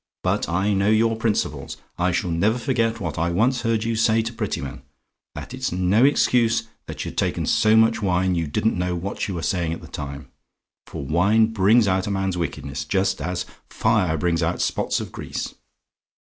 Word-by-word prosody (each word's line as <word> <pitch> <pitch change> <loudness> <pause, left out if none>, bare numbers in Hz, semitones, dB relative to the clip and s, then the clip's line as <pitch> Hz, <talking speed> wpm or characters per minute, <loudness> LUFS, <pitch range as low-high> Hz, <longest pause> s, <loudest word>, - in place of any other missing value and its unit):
But - - 0
I 95 +4 +1
know 100 +1 +2
your 115 +1 +3
principles. 110 -1 -2 0.2
I 90 +1 +2
shall 85 +1 -1
never 105 +8 +2
forget 115 -2 0
what 80 -6 -4
I 85 +1 +1
once 120 +9 +1
heard 115 -2 0
you 115 0 -1
say 110 0 +3
to 115 +1 -5
Prettyman: - - -4 0.5
and - - -8
it's - - -3
no 90 +6 +2
excuse 120 -5 +3 0.2
that - - -5
you'd - - -4
taken - - 0
so 110 0 +3
much 115 +1 +4
wine 95 -1 +1
you 85 -2 -1
didn't 105 +9 0
know 90 0 -1
what 95 +3 -3
you 95 - -4
were 85 - -4
saying 85 -1 0
at - - -7
the - - -11
time; 70 0 -7 0.6
for 70 - -6
wine 105 +9 +3
brings 110 +2 +4
out 95 +1 +1
man's 95 -2 -1
wickedness, 80 -5 -4
just 95 -5 0
as 90 +4 -3 0.2
fire 105 -8 +1
brings 85 +2 0
out 80 +2 -1
spots - - 0
of - - -6
grease. - - -5
95 Hz, 190 wpm, -23 LUFS, 85-110 Hz, 0.6 s, much